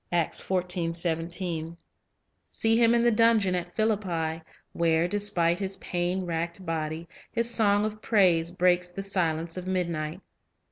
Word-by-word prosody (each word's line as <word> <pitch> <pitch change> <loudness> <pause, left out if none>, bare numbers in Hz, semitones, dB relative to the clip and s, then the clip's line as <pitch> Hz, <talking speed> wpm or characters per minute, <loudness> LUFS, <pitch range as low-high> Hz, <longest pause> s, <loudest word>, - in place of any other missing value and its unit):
3 170 -2 +2 2.2
See 225 0 +1
him 230 0 +4
in 235 - +3
the 240 - +4
dungeon 220 -4 +3
at 180 -1 -4
Philippi, 180 -7 -1 0.3
where, 165 0 +2
despite 175 -4 +1
his 195 -1 -2
pain 180 +1 -2
racked 170 +2 -3
body, 160 0 -3 0.2
his 235 0 -1
song 205 -2 +3
of 215 0 -5
praise 180 -8 +3
breaks 180 0 +2
the 195 +2 -6
silence 170 -3 -1
of 185 0 -6
midnight. 170 -3 -2
180 Hz, 130 wpm, -27 LUFS, 170-205 Hz, 2.2 s, him